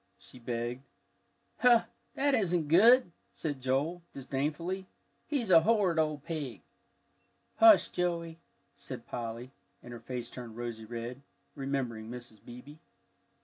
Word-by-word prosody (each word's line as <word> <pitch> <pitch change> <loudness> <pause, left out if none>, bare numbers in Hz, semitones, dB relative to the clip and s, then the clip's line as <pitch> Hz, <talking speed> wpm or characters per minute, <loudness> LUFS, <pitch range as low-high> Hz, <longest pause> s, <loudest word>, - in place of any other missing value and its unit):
she 125 - -14
begged. 120 +1 -3 0.8
"Hoh, 240 -2 +6 0.3
that 285 +1 +2
isn't 175 - +1
good!" 225 +5 +6 0.2
said 145 -5 -4
Joel, 140 +7 0
disdainfully. 150 +8 -3 0.4
"He's 250 -10 -1
a 165 -2 +8
horrid 190 -4 +2
old 155 -2 0
pig." 150 -7 -5 0.9
"Hush, 335 -2 +7
Joey," 170 -2 -2 0.4
said - - -8
Polly, 120 +1 -6 0.3
and 120 - -9
her 120 - -8
face 120 0 -6
turned 120 -3 -9
rosy 120 -2 -5
red, 120 +3 -6 0.3
remembering 130 -6 -3
Mrs. 120 -3 -10
Beebe. 125 +6 -11
140 Hz, 120 wpm, -31 LUFS, 120-175 Hz, 0.9 s, a